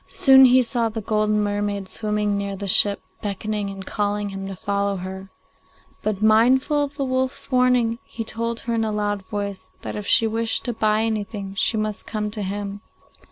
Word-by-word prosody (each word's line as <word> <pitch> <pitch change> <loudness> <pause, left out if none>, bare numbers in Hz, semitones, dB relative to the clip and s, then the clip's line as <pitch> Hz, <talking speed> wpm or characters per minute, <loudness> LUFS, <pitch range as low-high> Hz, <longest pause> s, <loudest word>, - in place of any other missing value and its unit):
Soon 265 -1 +7
he 255 0 +6
saw 235 -1 0
the 225 +1 -5
golden 215 0 +1
mermaid 205 -1 -2
swimming 210 0 -1
near 200 0 -3
the 200 +1 -5
ship, 200 +1 +4 0.2
beckoning 205 0 -3
and 195 -1 -8
calling 205 0 -1
to - - -9
him 195 0 -5
to 195 - -6
follow 200 +1 -1
her; 190 +1 -7 0.7
but, 215 -1 -2
mindful 255 +7 +4
of 285 0 -5
the 275 - -1
wolf's 260 +1 -2
warning, 250 -2 +3
he 230 - -6
told 230 +1 -3
her 235 - -3
in 225 -1 +1
a 220 - -1
loud 205 -1 -1
voice 200 -3 -4
that - - -5
if 210 -1 -5
she 225 - +5
wished 225 0 -1
to 240 - -1
buy 215 0 +1
anything 210 -3 -3
she 220 +3 +1
must 215 -1 -3
come 210 -1 -3
to 210 0 -4
him. 200 +1 -4
210 Hz, 195 wpm, -23 LUFS, 200-230 Hz, 0.7 s, Soon